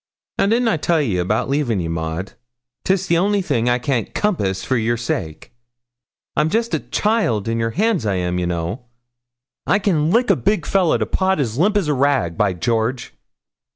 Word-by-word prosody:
'Now, - - +3
didn't 235 +3 +2
I 220 - +2
tell 165 +2 +1
ye 110 -12 0
about 95 +5 0
leavin' 135 -7 0
ye, 85 - -2
Maud? 80 +3 -4 0.5
'tis 190 0 +1
the 170 -2 +2
only 200 +1 +1
thing 120 -9 0
I 120 - +3
can't 125 -2 -2
compass 100 - 0
for 130 - 0
yer 120 0 0
sake. 95 -7 -4 0.8
I'm 150 +2 +2
jest 230 +5 -1
a - - +2
child 205 - 0
in 115 0 -1
yere 115 0 0
hands, 205 - 0
I 100 -3 0
am, 90 0 -1
ye 90 - -1
know. 90 +8 -3 0.8
I 200 - +4
can 165 -7 +1
lick 235 +6 +3
a - - +4
big 200 -6 0
fellah 185 -2 +2
to - - -1
pot 190 -2 0
as 120 -2 -2
limp 205 +5 +3
as 195 -6 0
a 150 - +2
rag, 135 -11 +1
by 100 0 +1
George!' 115 +6 -1
130 Hz, 195 wpm, -20 LUFS, -, 0.8 s, I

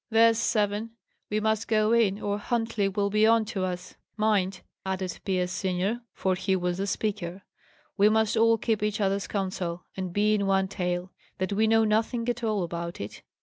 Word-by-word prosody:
"There's 225 0 +5
seven! 215 0 0 0.4
We 210 - 0
must 220 +1 0
go 215 0 +3
in, 210 -4 +3
or 205 0 -2
Huntley 225 -2 0
will 200 +1 -1
be 215 +1 +4
on 225 -1 +4
to 190 - -1
us. 180 0 -4 0.2
Mind!" 195 -4 +1 0.2
added 190 -1 -3
Pierce 180 -2 0
senior, 190 +5 -1
for 190 - 0
he 190 +1 0
was 180 0 -1
the 195 - -1
speaker, 195 -3 -3 0.5
"we 205 +2 +6
must 220 0 +2
all 230 0 +4
keep 220 -1 0
each 210 0 -1
other's 200 0 0
counsel, 185 -3 -3
and 185 -2 -4
be 210 +3 +2
in 200 -2 +1
one 195 0 +2
tale 180 -1 -3 0.3
that 185 +1 -1
we 220 +2 +3
know 225 0 +4
nothing 225 +2 +1
at 245 0 -2
all 215 -4 +1
about 170 0 -5
it." 100 - -7
205 Hz, 190 wpm, -27 LUFS, 185-220 Hz, 0.5 s, we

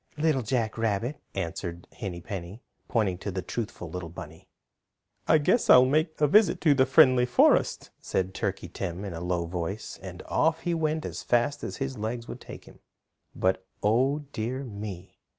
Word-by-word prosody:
"Little 150 -3 +2
Jack 115 -1 -1
Rabbit," 115 +5 -1
answered 85 -1 -4
Henny 95 -6 -5
Penny, 95 +3 -7 0.2
pointing 100 -6 0
to 100 - -4
the 95 -2 -3
truthful 100 -3 -5
little 85 +1 -6
bunny. 80 -2 -11 0.8
"I - - +6
guess 155 +11 +2
I'll 125 0 +9
make 155 +4 +1
a 150 - +5
visit 205 +3 +4
in 150 -3 +6
the 130 0 +4
Friendly 130 -3 +6
Forest," 125 - +3
said 95 0 -2
Turkey - - -3
Tim 95 +1 -5
in 95 - -5
a 85 - -6
low 90 -1 -1
voice, 90 +5 -5
and 95 -1 -8
off 160 0 +1
he 175 - -1
went 155 -1 -1
as - - -5
fast 130 +4 +1
as - - -4
his 135 -4 -4
legs 115 +2 -3
would - - -8
take - - -10
him. - - -16 0.6
But, 95 0 +1 0.2
Oh 130 +7 +2
dear 125 +4 -3
me! 100 -6 -8
110 Hz, 175 wpm, -27 LUFS, 95-135 Hz, 0.8 s, I'll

